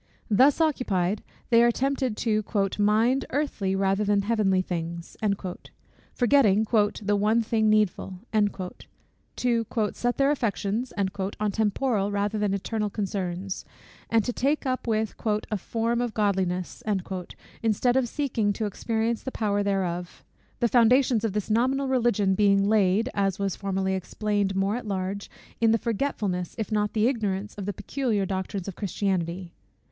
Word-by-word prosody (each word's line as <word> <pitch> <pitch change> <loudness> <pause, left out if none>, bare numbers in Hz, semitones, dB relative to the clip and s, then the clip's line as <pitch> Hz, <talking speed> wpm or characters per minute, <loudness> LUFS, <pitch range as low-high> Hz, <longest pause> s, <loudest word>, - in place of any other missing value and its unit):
Thus 260 +9 +5
occupied, 210 - +1 0.3
they 230 0 +7
are 240 - +6
tempted 260 -2 0
to 215 -2 +1 0.4
"mind 225 +6 +3
earthly 235 -9 -1
rather 195 +1 +1
than 205 -1 +2
heavenly 200 -4 +2
things," 170 -1 -5 1.0
forgetting 230 -5 +4
"the 205 -2 +1
one 215 +3 +2
thing 220 -1 +2
needful;" 210 -3 +1 1.2
to 235 -2 +1 0.3
"set 245 0 -1
their 275 +1 +3
affections" 230 -2 -1
on 200 +1 -1
temporal 210 0 0
rather 205 +1 -1
than 205 -1 +1
eternal 210 +2 -2
concerns, 190 -2 -3 0.5
and 225 -1 +3
to 245 - -1
take 285 +5 0
up 255 -1 -2
with 220 -1 0 0.4
"a 210 - +1
form 230 +4 -1
of 240 -2 -3
godliness," 190 -4 0 0.8
instead 230 +3 +2
of 260 -2 +2
seeking 235 -8 0
to 215 - -2
experience 225 +2 -1
the 260 - -5
power 205 -4 0
thereof: 180 -3 -2 0.4
the 240 - +4
foundations 240 0 +4
of 220 -4 0
this 210 +1 -2
nominal 260 +5 +2
Religion 235 -7 +2
being 200 0 +4
laid, 205 +1 +3
as 195 -2 0
was 195 -3 -1
formerly 190 -1 -1
explained 200 +1 -1
more 195 +2 +1
at 245 -2 -5
large, 195 0 -3 0.3
in 230 -1 +4
the 225 - +4
forgetfulness, 205 -7 -2
if 220 -1 -3
not 210 -1 +1
in - - -34
the 220 +1 +3
ignorance, 210 -5 -1
of 200 -1 -6
the - - 0
peculiar 210 0 -1
doctrines 190 0 -3
of 195 - -5
Christianity. 185 -3 -2
210 Hz, 145 wpm, -26 LUFS, 195-235 Hz, 1.2 s, they